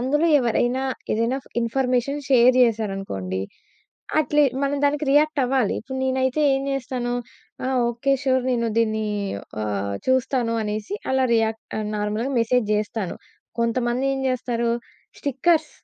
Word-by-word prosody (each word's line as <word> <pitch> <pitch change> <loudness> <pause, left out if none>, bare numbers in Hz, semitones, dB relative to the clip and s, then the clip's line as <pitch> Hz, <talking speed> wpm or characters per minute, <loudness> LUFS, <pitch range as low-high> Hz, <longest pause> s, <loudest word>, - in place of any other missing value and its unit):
అందులో 295 +6 +2
ఎవరైనా, 245 +1 +1 0.3
ఏదన్నా 230 +4 0 0.2
ఇన్ఫర్మేషన్ 255 +3 0
షేర్ 255 -1 +6
చేసారనుకోండి. 195 - -2 0.8
అట్లీ 295 -1 +3 0.2
మనం 280 +1 +1
దానికి 290 +1 +1
రియాక్ట్ 300 0 +3
అవ్వాలి. 255 -4 +1
ఇప్పుడు 265 +3 -6
నేనైతే 260 +2 +1
ఏం 270 - -1
చేస్తాను 250 -2 -2 0.5
ఆహ్, 260 0 0
ఓకే 240 +4 0
సూర్ 260 -1 +2
నేను 235 -1 0
దీన్ని 220 -1 +1 0.6
ఆహ్, 100 -1 -2
చూస్తాను 255 -2 +1
అనేసి 215 - -3 0.2
అలా 265 0 +3
రియాక్ 225 0 +1 0.4
నార్మల్‌గా 210 +5 -2
మెసేజ్ 235 0 +2
జేస్తాను. 210 -2 -2 0.4
కొంతమంది 240 +2 0
ఏం 270 - -3
చేస్తారు 240 -2 -1 0.5
స్టిక్కర్స్, 300 +3 +1
250 Hz, 120 wpm, -23 LUFS, 225-270 Hz, 0.8 s, షేర్